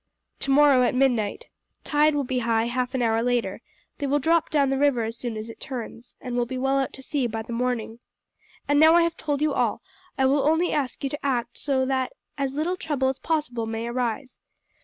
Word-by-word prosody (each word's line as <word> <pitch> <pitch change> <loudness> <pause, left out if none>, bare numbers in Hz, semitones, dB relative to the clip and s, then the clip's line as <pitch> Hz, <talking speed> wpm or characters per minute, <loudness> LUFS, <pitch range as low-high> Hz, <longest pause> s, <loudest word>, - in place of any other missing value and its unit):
"Tomorrow 275 -1 +5
at 250 - +2
midnight. 245 -6 +1 0.4
Tide 300 0 +3
will 285 - +1
be 255 -1 -1
high 230 -1 +1
half 250 +2 -2
an 250 - +1
hour 225 -1 +2
later; 245 0 -1 0.4
they 285 - -1
will 285 +2 +2
drop 325 +3 +2
down 280 -3 +2
the 270 - +1
river 280 -5 +3
as 225 +1 -4
soon 235 -2 -5
as 215 +1 -6
it 230 - -10
turns, 245 -2 -7
and 250 -2 -5
will 240 -1 0
be 260 +1 -4
well 270 +1 +1
out 270 - -1
to 265 - -10
sea 275 -3 -1
by 225 -1 -4
the 235 +1 -7
morning. 235 -2 -2 0.7
And 290 0 +3
now 320 +2 +7
I 345 - +6
have 335 0 -1
told 295 -1 -2
you 305 -2 +2
all, - - 0 0.3
I 265 - +3
will 275 +2 +3
only 320 +5 +2
ask 275 -3 -2
you 275 - 0
to 290 - -6
act 245 -4 -1
so 265 -2 +1
that 260 -1 -1 0.2
as 275 -2 -2
little 340 +5 -1
trouble 285 -6 0
as 265 - -4
possible 270 -8 -2
may 225 +1 -3
arise. 245 +1 -3
265 Hz, 225 wpm, -25 LUFS, 240-290 Hz, 0.7 s, now